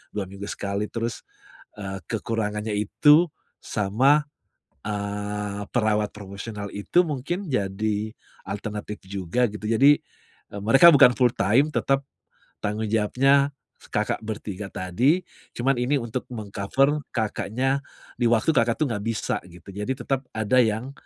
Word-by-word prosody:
2 105 - -1
minggu 100 +2 -8
sekali, 100 +1 -3
terus, 115 0 -3 0.6
eee, 95 -2 -5
kekurangannya 110 -1 -2
itu, 150 - +5 0.3
sama, 130 +9 +2 0.6
eee, 105 0 -3
perawat 105 -3 +2
profesional 100 +1 -7
itu 175 - +2
mungkin 160 +4 -3
jadi 105 0 -1 0.3
alternatif 105 0 -5
juga 100 +6 0
gitu, 105 0 -6
jadi, 135 +6 +5 0.6
eee, 100 - -5
mereka 135 +10 +7
bukan 125 - +8
fulltime, 125 +2 +3
tetap, 135 0 +1 0.5
tanggung 105 +2 -2
jawabnya 135 +6 +3 0.4
Kakak - - 0
bertiga 105 -2 -5
tadi, 120 - +1 0.3
cuman 135 +3 +1
ini 125 +4 +1
untuk 120 +2 -4
meng-cover 120 +7 0
Kakaknya 130 +4 -1 0.3
di 120 - -1
waktu 115 +6 +3
Kakak 115 +1 +2
tuh 150 - +3
nggak 105 -3 -3
bisa 115 -1 -1
gitu, 85 -1 -16
jadi 105 +6 -4
tetap 135 0 -3
ada 110 +3 +1
yang, 110 +5 -1
110 Hz, 125 wpm, -25 LUFS, 105-130 Hz, 0.6 s, bukan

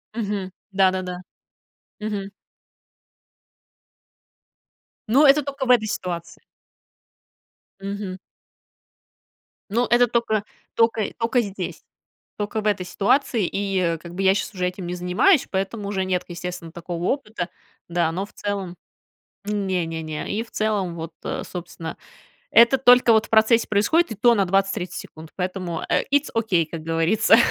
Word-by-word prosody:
Мгм. 200 -4 -3 0.2
Да-да-да. 185 -2 +1 0.8
Мгм. 205 -2 -3 2.8
Но 275 +6 +5
это 290 +2 +6
тока 275 -1 -4
в - - -5
этой 215 -3 +4
ситуации. 170 -4 -5 1.4
Мгм. 195 -1 -5 1.5
Но 235 +4 +1
это 245 0 +5
тока 220 -3 0 0.3
тока 230 -1 +3 0.2
тока 235 +2 +2
здесь, 195 -4 -6 0.5
тока 210 +1 -2
в 210 - -2
этой 195 -3 0
ситуации, 210 +2 +1
и 190 -4 0
как 170 0 -10
бы 195 - -2
я 190 0 +5
сейчас 205 - -3
уже 180 0 -1
этим 180 -1 -5
не 180 - -3
занимаюсь, 180 - +3
поэтому 200 +2 -2
уже 190 -2 -1
нет, 185 -1 0
естественно, 175 -1 -6
такого 170 0 -6
опыта. 215 -10 -2 0.4
Да, 170 -1 +1
но 190 +4 -3
в - - -20
целом 195 -3 -4 0.7
не-не-не, 170 -6 -2
и 225 - -1
в 230 - -20
целом 205 -5 -1
вот, 160 0 -6
э, - - -3
собственно, 170 -2 -7 0.5
это 235 +3 +6
только 245 -2 +6
вот 220 0 +3
в - - -26
процессе 225 +1 +4
происходит, 220 +8 +2
и - - -4
то 235 +2 +5
на 200 -2 +2
20-30 195 0 0
секунд, 155 0 -12
поэтому, 180 -2 -3
э, - - +2
итс 285 +1 +2
окей, 190 -8 +2
как 160 0 -7
говорится. 165 +7 +4
195 Hz, 135 wpm, -23 LUFS, 180-220 Hz, 2.8 s, это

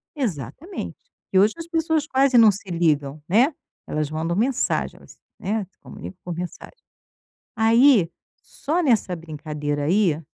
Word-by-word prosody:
Exatamente, 255 - -4 0.3
porque 190 - +1
hoje 210 +2 +4
as 330 0 -7
pessoas 320 -2 0
quase 265 -1 +3
não 220 -2 +8
se 195 0 -9
ligam, 155 -4 0
né, 245 - +4 0.3
elas 150 -1 -2
mandam 160 +2 -2
mensagens, 245 +5 -1 0.2
né, 205 +1 -2
se 185 - -39
comunicam 185 - -10
por 175 - -4
mensagem. 180 - -7 0.8
Aí, 225 - +5 0.3
só 340 +4 -2
nessa 225 - +2
brincadeira 150 -2 -4
aí, 175 -2 +2
195 Hz, 135 wpm, -23 LUFS, 160-260 Hz, 0.8 s, não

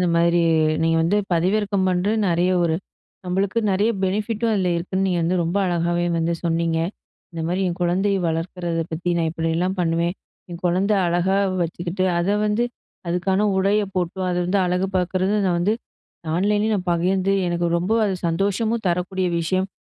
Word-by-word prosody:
இந்த 180 - +2
மாரி 170 +1 +3 0.4
நீங்க 165 0 +2
வந்து 170 +5 +2 0.2
பதிவிறக்க 200 +4 +1
பண்றது, 185 +4 +1
நெறைய 175 +2 +2
ஒரு 165 -2 +1 0.5
நம்மளுக்கு 195 +4 0
நெறைய 205 +4 +2
பெனிஃபிட்டு 210 +4 -1
அதில 185 -4 +1
இருக்குன்னு, 185 +3 -1
நீங்க 180 -2 0
வந்து 175 +3 +1
ரொம்ப 170 +4 -2
அழகாவே, 175 0 0
வந்து 165 +1 0
சொன்னிங்க. 165 -1 0 0.5
இந்த 165 - -5
மாரி 185 +2 0
என் 175 +2 -4
கொழந்தைய 195 +3 +1
வளர்க்கறத 165 0 -2
பத்தி, 170 +3 -3
நான் 165 -1 +1
இப்படிலா 165 +2 -1
பண்ணுவே. 170 0 +1 0.4
என் 170 0 -7
கொழந்த 185 +4 +2
அழகா 175 +3 +1 0.3
வச்சுக்கிட்டு, 175 +3 -2
அத 175 - 0 0.2
வந்து 210 +3 +1 0.4
அதுக்கான 190 +3 +1
உடைய 200 +2 +2
போட்டு, 180 0 -2
அத 175 - -1
வந்து 195 +3 +1
அழகு 180 +1 0
பாக்கறது, 185 +2 0
அத 190 - +2
வந்து 185 +5 +2 0.6
ஆன்லைன்ல 210 +3 +1
நான் 190 -2 -3
ப - - +3
வியந்து 190 +1 +1
எனக்கு 175 0 0
ரொம்ப 180 +5 -1
அது 195 - 0
சந்தோஷமு 200 +7 0
தரக்கூடிய 180 +1 0
விஷயம். 185 +3 0
180 Hz, 160 wpm, -22 LUFS, 170-195 Hz, 0.6 s, மாரி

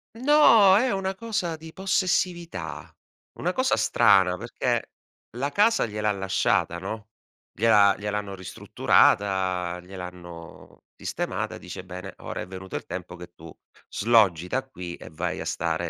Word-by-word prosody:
No! 230 -7 +6
È 250 +3 +2
una 195 0 -2
cosa 195 -6 -3
di 160 0 -12
possessività. 175 - -2 0.4
Una - - 0
cosa - - +1
strana, 95 -3 +4
perché 120 +1 -2 0.5
la 140 +3 -1
casa 210 - +3
gliel'ha 105 0 -1
lasciata, 95 -3 0
no, 105 +4 -7 0.4
gliel'ha 105 -1 +4
gliel'hanno 105 -1 -4
ristrutturata, 95 -1 +1
gliel'hanno 90 -2 -11
sistemata, - - -4
dice: 90 - -9
"Bene, 90 0 -8
ora - - -6
è - - -5
venuto 95 0 -8
il - - -4
tempo 90 0 -7
che 85 0 -12
tu 80 -2 -12 0.4
sloggi 100 -7 +3
da 130 +8 -1
qui 90 -8 -7
e - - -11
vai 80 - -3
a - - -6
stare 85 +1 -2
100 Hz, 135 wpm, -25 LUFS, -, 0.5 s, No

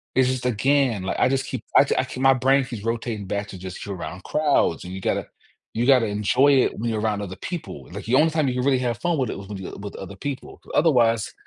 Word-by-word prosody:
It's 130 -1 +4
just 130 -1 -2
again, 125 -2 +2
like, 95 - -2
I 125 - +4
just 135 0 0
keep, - - -5
I - - +7
I - - +3
keep 130 - -7
my 135 0 +6
brain 135 +1 +3
keeps 120 -5 -7
rotating 115 -3 -3
back 100 +1 -2
to 95 - -9
just 95 +2 -8
you're 100 -1 -5
around 90 +1 -7
crowds, 145 - +1
and 90 +1 -8
you 95 - -5
gotta - - -1 0.5
you 115 +2 0
gotta 130 -4 +5
enjoy 105 +7 +3
it - - -2
when 115 +2 -2
you're 110 -1 -1
around 105 -1 -1
other 95 -2 -6
people, 170 -3 -6
like, 100 0 -6
the 120 +3 +2
only 160 +4 +5
time 155 -4 +1
you 125 - -2
can 125 +1 -1
really 135 -2 +4
have 120 -3 -1
fun 175 -2 0
with 130 - 0
it - - -4
was 100 - -9
when 105 -1 -6
you 95 - -7
uh, - - -9
with 100 0 -8
other 100 0 -8
people. 140 +3 -6 0.2
Otherwise, 120 -9 +3
120 Hz, 265 wpm, -23 LUFS, 100-135 Hz, 0.5 s, I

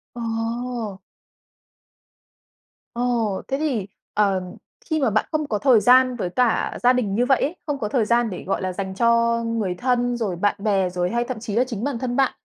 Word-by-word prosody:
Ồ. 230 -2 -3 2.0
Ồ, 235 -5 0
thế 270 - -1
thì, 260 -11 -1 0.3
ờ, 200 -3 +2 0.4
khi 315 -2 -1
mà 260 -5 +2
bạn 215 +1 +1
không 305 -2 -1
có 210 -2 -1
thời 255 -6 +5
gian 255 +2 +5
với 185 -6 -3
cả 245 +3 +1
gia 250 +1 +6
đình 210 -6 0
như 245 +2 +2
vậy 270 - +3
ấy, 315 +6 -1
không 285 -2 -2
có 210 - -2
thời 230 -4 +1
gian 235 0 +2
để, 180 - -6
gọi 195 - -2
là, 185 -1 -2
dành 190 0 -4
cho 235 +1 +2
người 220 -6 -1
thân, 245 +1 0
rồi 205 -6 -2
bạn 205 +4 +1
bè 195 -3 +1
rồi 180 0 -1
hay 235 +1 0
thậm 245 -2 -5
chí 220 -2 -5
là 245 - +4
chính 225 -3 -5
bản 275 -5 -2
thân 245 -1 -2
bạn, 270 -1 +3
235 Hz, 200 wpm, -22 LUFS, 205-250 Hz, 2.0 s, gia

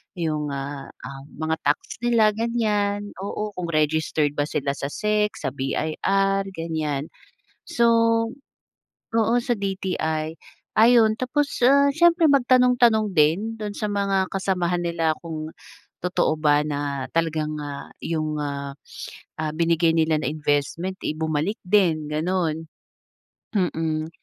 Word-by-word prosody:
yung, 155 -4 -2
ah, 140 0 -5
ah, 135 0 -10
mga 160 +1 -1
tax 145 - -1
nila, 230 -3 +4
ganiyan. 210 -3 0
Oo, 210 +1 -3
kung 180 -2 -4
registered 155 -1 +1
ba - - +3
sila 140 -2 -1
sa 140 - -4
SEC, 210 +2 +1
sa - - -3
BIR 195 +8 0
ganiyan. 155 -3 -2 0.6
So, 235 - +2 1.3
oo, 225 +1 +3
sa 240 - 0
DTI, 170 -5 -2 0.4
ayun. 225 -1 +5
Tapos, 280 +4 -1
ah, 280 +2 +6
siyempre 340 0 +5
magtanong-tanong 245 -5 +4
din 185 +10 +2
dun 210 -2 -5
sa 210 +1 -3
mga 195 -2 0
kasamahan 180 -2 0
nila 165 -2 0
kung 155 -2 -6 0.5
totoo 180 -3 +1
ba 150 -1 +4
na 145 -3 -3
talagang, 155 -2 0
ah, 145 -1 -7
yung, 155 -2 -2
ah, 140 -1 -4 0.7
ah, 155 - -1
binigay 165 0 +2
nila 160 -1 +2
na 130 - -2
investment, 155 +5 -1
eh, - - 0
bumalik 160 +5 -1
din, 180 -6 +3
gano'n. 160 0 -1 0.9
Mm. 160 -4 -1
165 Hz, 125 wpm, -24 LUFS, 155-210 Hz, 1.3 s, ah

